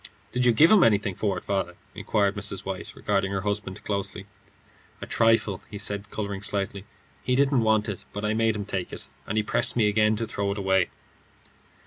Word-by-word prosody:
"Did 125 0 +1
you - - +7
give 150 +9 +5
him 210 -5 +7
anything 105 -2 +3
for 100 0 -1
it, - - -7
father?" 95 -3 -1 0.2
inquired 100 -1 0
Mrs. 105 - 0
White, - - -6
regarding 100 -1 0
her 95 -1 -1
husband 100 0 -3
closely. 100 -1 -3 0.7
"A - - -6
trifle," 115 -4 +2 0.2
said 100 0 -3
he, - - -26
colouring 100 -2 -4
slightly. 100 -1 -1 0.4
"He 125 - 0
didn't 135 -1 +3
want 110 -1 +2
it, 100 -4 -5
but 105 +1 -4
I 105 - +1
made 110 0 +2
him 100 -1 -4
take 95 -3 -4
it. - - -8 0.2
And 105 - -2
he 110 - +2
pressed 120 +3 +2
me 110 -3 +3
again 110 +1 +3
to 115 +1 -2
throw 100 -2 -2
it - - -9
away." 95 -2 +2
105 Hz, 200 wpm, -26 LUFS, 100-110 Hz, 0.7 s, you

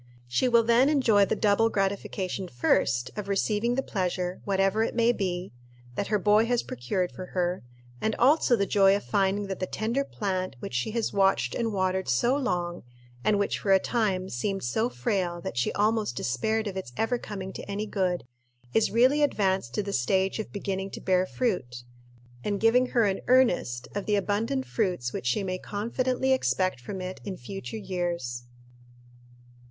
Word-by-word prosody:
She 125 - +1
will 235 -1 +5
then 235 +4 +4
enjoy 230 -9 +4
the - - -1
double 215 +2 +3
gratification, 195 -2 -2
first, 120 -2 +1
of 210 -2 -5
receiving 210 +4 +1
the 270 - 0
pleasure, 180 -3 -2
whatever 195 +2 +2
it 225 - -1
may 235 0 +4
be, 185 - -3 0.4
that 200 - -2
her 210 - +2
boy 210 +2 +4
has 245 -1 +1
procured 150 +10 -2
for 185 - -8
her, 180 0 0 0.4
and 220 0 0
also 270 -1 +4
the 200 -3 +1
joy 195 -1 +4
of 205 - -3
finding 200 0 +1
that 195 -1 -5
the 185 - -2
tender 230 +6 -1
plant 185 - -3
which - - -7
she 125 - -1
has 230 0 -2
watched 195 -12 +2
and 230 -2 -1
watered 190 -3 0
so 235 - +3
long, 175 -10 -2 0.4
and 205 - +3
which 200 - 0
for 195 - 0
a - - +8
time 190 -3 0
seemed 195 +8 -2
so 220 - 0
frail 185 -9 -1
that 170 - -6
she 120 - +1
almost 215 - +1
despaired 220 - -1
of 200 -2 -4
its 190 -10 -5
ever 240 +2 0
coming 190 -4 -6
to - - -8
any 205 +2 -2
good, 185 -4 -1 0.5
is 225 - +3
really 255 +6 +4
advanced 190 - +1
to 210 - 0
the 200 0 -4
stage 190 - +1
of 220 - -5
beginning 195 -1 -3
to - - -7
bear 185 0 +2
fruit, 125 - -2 0.6
and 205 -1 -1
giving 245 +3 +4
her 235 -3 +2
an 195 -1 0
earnest 230 - +3
of 200 -1 -4
the 210 - +3
abundant 220 +7 0
fruits 180 - -1
which 125 - -4
she 125 +11 +1
may 185 -1 -3
confidently 250 +6 0
expect 185 - +1
from 185 +10 -6
it 185 0 -6
in 195 -3 -5
future 195 - -7
years. 175 - -3
200 Hz, 180 wpm, -27 LUFS, 185-225 Hz, 0.6 s, a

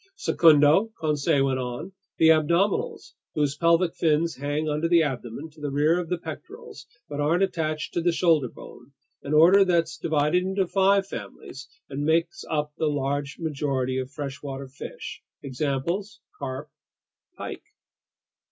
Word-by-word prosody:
"Secundo," 160 - +4
Conseil 150 -2 +1
went 130 -1 0
on, 125 +9 -5 0.3
"the 160 - +5
abdominals, 170 +5 +1 0.2
whose 145 -2 +1
pelvic 170 +1 +3
fins 160 +1 +1
hang 145 +3 -2
under 150 +2 0
the 170 -1 +5
abdomen 130 0 -4
to 150 0 -18
the 145 - -2
rear 150 +5 +2
of 170 -2 -5
the 180 - 0
pectorals 425 - -10 0.2
but 145 -1 -6
aren't 165 +6 +2
attached 155 -5 -2
to 170 - 0
the 175 +1 +2
shoulder 165 -5 +2
bone, 120 +4 -14 0.3
an 150 - -2
order 180 +6 +7
that's 165 -3 +1
divided 155 +2 +1
into 190 +1 0
five 195 +2 +3
families 135 - -9 0.2
and 140 +1 -4
makes 165 - +1
up 150 -1 -1
the 155 - +1
great 145 0 -1
majority 135 -5 -1
of 130 0 -4
freshwater 140 -1 -6
fish. 135 +1 -8 0.2
Examples: 150 - -2 0.2
carp, 135 +1 -5 0.7
pike." - - -6
155 Hz, 145 wpm, -25 LUFS, 140-170 Hz, 0.7 s, order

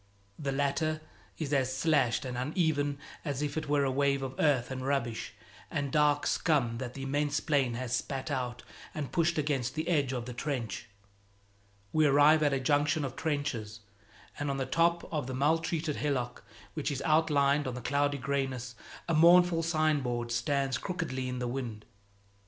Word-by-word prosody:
The 140 -2 -2
latter 145 +3 0 0.4
is 150 -2 -3
as 130 -2 +2
slashed 140 -5 +2
and 125 -1 -4
uneven 145 +1 0 0.3
as 145 -2 -2
if 145 -1 -2
it 155 -2 -3
were 145 -1 +3
a 135 - +1
wave 140 0 +1
of 130 -1 -4
earth 135 -5 +2
and 130 -1 -4
rubbish 130 -4 -2 0.3
and 140 -1 -2
dark 150 -1 +3
scum 125 -8 +1
that 125 -2 -5
the 135 - -5
immense 145 +2 0
plain 140 -6 +1
has 125 0 -2
spat 135 +3 -3
out 125 -3 -3 0.3
and 145 -3 -4
pushed 170 -1 +1
against 140 -4 -1
the 160 +1 -2
edge 145 -7 +2
of 125 -3 -3
the 125 - -6
trench. 120 -5 -4 1.0
We 155 -1 +4
arrive 145 +3 +6
at 145 -1 +3
a 135 - +1
junction 145 +2 +2
of 130 -1 -6
trenches, 135 -8 -3 0.6
and 145 -1 -1
on 140 - -1
the 135 - -1
top 170 +3 +1
of 150 -5 -1
the 130 - -4
maltreated 155 +2 0
hillock 125 -5 -2 0.3
which 155 -2 -2
is 140 -2 -3
outlined 150 -3 +3
on 125 - -3
the - - -4
cloudy 145 +3 0
grayness, 130 -2 -2 0.3
a 170 - +1
mournful 170 +1 +6
signboard 145 -8 0
stands 135 +1 0
crookedly 160 -9 -3
in 125 - -3
the 125 0 -2
wind. 120 -4 -5
140 Hz, 175 wpm, -30 LUFS, 130-150 Hz, 1.0 s, arrive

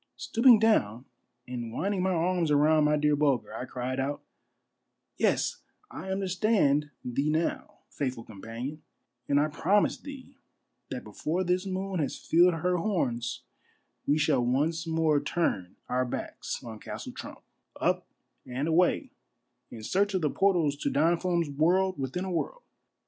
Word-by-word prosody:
Stooping 235 0 +5
down 130 - +2 0.4
and 120 -2 -5
winding 195 - -1
my 190 - +1
arms 175 -1 +1
around 150 +1 +4
my 150 0 +3
dear 150 0 +3
Bulger, 140 -4 +1
I 125 - -4
cried 130 +1 -4
out, 140 +2 -2 0.3
— - - -52
" - - -52
Yes, - - +1 0.3
I 190 - -7
understand 185 -6 +2 0.2
thee 135 +4 0
now, 160 +2 -2
faithful 130 -5 -3
companion; 115 +9 -7 0.5
and 140 - +4
I 150 - +3
promise 200 +7 +2
thee 280 -3 -11 0.5
that - - -5
before 175 +5 -2
this 180 +2 0
moon 190 0 -2
has 145 - -1
filled 175 +1 +4
her 180 +2 0
horns 125 - -1 0.6
we 145 - +3
shall 145 -4 +2
once 155 +7 0
more 160 -2 +2
turn 140 - -1
our 125 +1 +1
backs 125 - -5
on 110 -2 -8
Castle - - -7
Trump, - - -9 0.4
up - - 0 0.4
and 130 +4 -2
away 170 +2 +2 0.6
in 110 -2 -9
search 200 - +1
of 185 - +1
the 150 - +2
portals 175 -7 +2
to - - -1
Don 165 +4 +3
Fum's 175 -3 0
World 180 +5 +2
within 135 +8 -3
a 190 - -4
World." - - -3
155 Hz, 155 wpm, -28 LUFS, 135-185 Hz, 0.6 s, Stooping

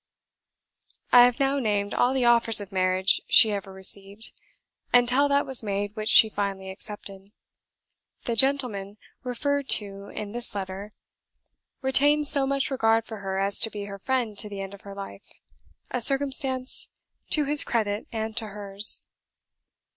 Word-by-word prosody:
I 245 0 +8
have 245 +2 0
now 275 0 +1
named 205 -4 -1
all 245 - +2
the 255 -2 +1
offers 235 -2 +5
of 200 -1 -7
marriage 185 0 +1
she 220 - +6
ever 200 -1 -5
received, 195 +2 -2 0.6
until 245 +3 +3
that 280 0 +2
was 265 -2 -3
made 205 -1 -4
which 215 -1 -4
she 220 - +7
finally 195 -2 -4
accepted. 195 -1 -10 0.9
The 235 - -2
gentle 270 +2 +2
man 200 0 -8 0.3
referred 280 +2 -2
to 200 -1 -9
in 210 0 -7
this 240 -1 -5
letter 195 +1 -6 0.9
retained 290 +3 +3
so 280 -1 +2
much 275 0 -1
regard 225 -3 +1
for 220 - -8
her 190 -1 -4
as 195 +1 0
to 225 - -1
be 205 -2 -7
her 200 0 -8
friend 245 -1 -2
to 210 - -2
the 200 -1 -7
end 195 0 -7
of 200 - -13
her 200 -1 -11
life; 195 - -10 0.6
a 250 - -2
circumstance 270 0 +1 0.4
to 300 -2 +1
his 295 +1 +3
credit 210 -3 -2
and 220 -1 -4
to 225 -2 0
hers. 200 0 +2
215 Hz, 160 wpm, -25 LUFS, 200-255 Hz, 0.9 s, I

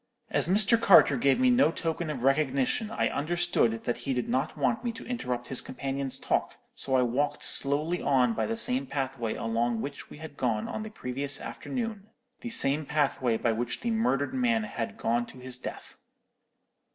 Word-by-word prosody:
As - - +2
Mr. 210 +5 +4
Carter 180 -9 +7
gave 135 - +2
me 255 -1 +4
no 245 -7 +4
token 165 0 -3
of 130 -5 -4
recognition, 135 - +1
I 225 - 0
understood 155 -7 0
that 120 - -2
he 130 +2 -2
did 125 - -2
not 130 +5 -1
want 130 - 0
me 240 - -1
to 225 - -10
interrupt 125 - -4
his 130 - +3
companion's 135 0 -3
talk, - - -1 0.2
so 130 - -1
I 130 - +4
walked 130 +5 -1
slowly 150 +5 +4
on 125 -4 +2
by - - -1
the 225 - -2
same 255 +3 +2
pathway 130 - -3
along 115 +1 -1
which 140 +5 -6
we - - -11
had 155 -1 -10
gone 115 -4 -1
on - - -5
the 215 - -6
previous 140 - -4
afternoon; 225 -5 -5 0.3
the 240 - -6
same 150 -9 +2
pathway 135 -6 +1
by 115 - 0
which 120 +2 -3
the 235 - -1
murdered 220 - 0
man 235 -4 +1
had 120 - -5
gone 120 +1 0
to - - -13
his 125 0 -6
death. - - -8
140 Hz, 190 wpm, -28 LUFS, 125-200 Hz, 0.3 s, Carter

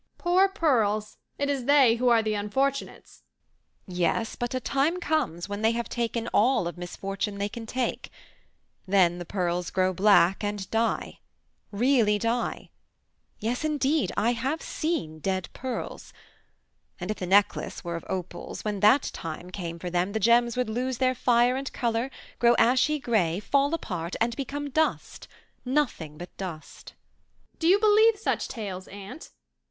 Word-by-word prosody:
"Poor 370 +2 +3
pearls! 220 - +1 0.2
It 285 - -1
is 275 -3 -1
they 270 -5 +5
who 250 +1 +2
are 230 -2 +4
the 215 -1 0
unfortunates." 265 +7 -2 0.6
"Yes, 180 +5 -1
but 240 +1 -3
a - - 0
time 285 +7 0
comes 290 - -1
when 205 +1 -5
they 225 +1 +3
have 235 0 -3
taken 235 -1 -2
all 220 -5 +3
of 175 - -5
misfortune 195 +3 -4
they 200 0 -1
can 225 +2 -8
take; 255 +1 -2 0.8
then 180 -3 +3
the 175 - -6
pearls 175 -1 -2
grow 185 0 +1
black 195 0 +4
and 205 -2 -3
die, 225 0 -1 0.5
really 220 -1 +3
die. 230 +3 -2 0.7
Yes, 235 +6 -2
indeed! 300 -1 +1
I 225 +4 +3
have 265 +7 -2
seen 290 - -3
dead 190 +1 -2
pearls. 255 -1 -6 0.9
And 180 +3 -3
if 215 - -4
the 180 - -4
necklace 200 +2 +2
were 170 -1 -4
of 165 - -6
opals, 185 +3 -5
when 210 -2 -2
that 215 +8 +5
time 165 +2 -7
came 170 -3 -5
for 175 +1 -6
them 180 +3 0
the 220 - 0
gems 235 +2 +3
would 250 - 0
lose 250 +3 -2
their 255 0 +2
fire 245 0 +3
and 270 0 -4
colour, 235 +1 -1 0.3
grow 240 0 +5
ashy 255 +6 +3
grey, 210 - 0
fall 280 +6 +1
apart 175 - -5
and 230 +1 0
become 285 +2 -4
dust, 315 +3 -1 0.4
nothing 250 - -1
but 175 +2 -10
dust." 175 -5 -8 0.6
"Do 325 - +1
you 375 +3 +6
believe 435 +1 +5
such 425 - -1
tales, 195 -5 -6
aunt? 200 +9 -10
230 Hz, 160 wpm, -27 LUFS, 190-265 Hz, 0.9 s, you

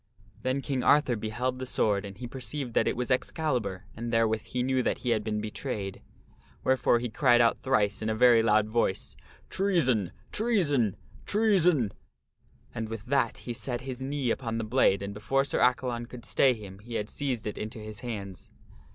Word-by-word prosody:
Then 130 +3 -1
King 135 -3 -1
Arthur 145 -2 +4
beheld 120 +4 -2
the 130 - -4
sword 105 -4 +1
and 100 -1 -9
he 125 - -6
perceived 130 +1 -5
that - - +2
it - - 0
was 125 +1 -2
Ex 125 - +1
calibur 120 - -2
and 115 +1 -4
therewith 110 -1 +2
he 125 -1 -3
knew 130 0 +1
that - - 0
he 120 - +2
had 110 -2 +1
been 105 -1 -2
betrayed. 105 -2 -5 0.6
Wherefore 130 -2 +3
he 120 +1 -2
cried 120 +1 +4
out 115 -1 +4
thrice, 105 -6 +1
in 110 - -1
a 110 - 0
very 120 0 +6
loud 110 -1 +3
voice, 110 -4 -1 0.2
" - - -27
Treason! 130 - +2 0.2
Treason! 150 - +1 0.3
Treason! 180 - +3 0.4
" - - -34
and 110 -1 -4
with 115 -2 -6
that 130 -3 +1
he 120 - -3
set 120 +1 -3
his 130 -1 -6
knee 135 -2 -1
upon 115 -3 -2
the 115 - -2
blade 110 -4 +3
and 100 0 -4
before 135 +7 0
Sir - - -1
Accalon 125 -1 +1
could 120 -1 -10
stay 130 -2 +3
him 100 -3 -10
he 115 +3 -8
had 105 - -1
seized 130 -2 -3
it 105 - -4
into 110 +3 -5
his 110 -1 -7
hands. 100 -7 -6
120 Hz, 195 wpm, -28 LUFS, 110-130 Hz, 0.6 s, very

